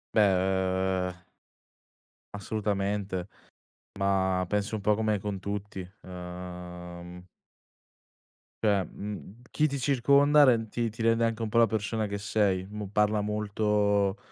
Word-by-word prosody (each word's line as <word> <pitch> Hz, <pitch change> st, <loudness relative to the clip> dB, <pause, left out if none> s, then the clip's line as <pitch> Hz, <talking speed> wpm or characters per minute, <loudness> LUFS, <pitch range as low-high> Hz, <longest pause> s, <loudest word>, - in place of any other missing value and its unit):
Beh, 95 Hz, -2 st, +2 dB
uhm 90 Hz, -1 st, -19 dB, 1.1 s
assolutamente, 100 Hz, -2 st, -2 dB, 0.7 s
ma 95 Hz, -1 st, +1 dB
penso 105 Hz, +1 st, -1 dB
un -, -, -5 dB
po' 105 Hz, +1 st, +3 dB
come 110 Hz, -1 st, 0 dB
con 100 Hz, -1 st, -4 dB
tutti, 100 Hz, -1 st, -5 dB, 0.2 s
uhm 90 Hz, -1 st, -8 dB, 1.4 s
cioè, 100 Hz, -3 st, +3 dB
mhmm, 105 Hz, +3 st, -8 dB
chi 155 Hz, -, +2 dB
ti 140 Hz, -1 st, -3 dB
circonda 140 Hz, +3 st, +5 dB
rend 115 Hz, -3 st, +3 dB
ti 115 Hz, +1 st, -1 dB
ti 115 Hz, +2 st, -8 dB
rende 115 Hz, 0 st, +3 dB
anche 115 Hz, 0 st, -2 dB
un 110 Hz, -, -1 dB
po' 115 Hz, -, 0 dB
la 115 Hz, -1 st, +6 dB
persona 110 Hz, +1 st, -1 dB
che 100 Hz, 0 st, -3 dB
sei, 100 Hz, -3 st, +1 dB
mo 105 Hz, -1 st, -5 dB
parla 105 Hz, +1 st, +2 dB
molto 105 Hz, -1 st, +1 dB
105 Hz, 125 wpm, -28 LUFS, 95-110 Hz, 1.4 s, la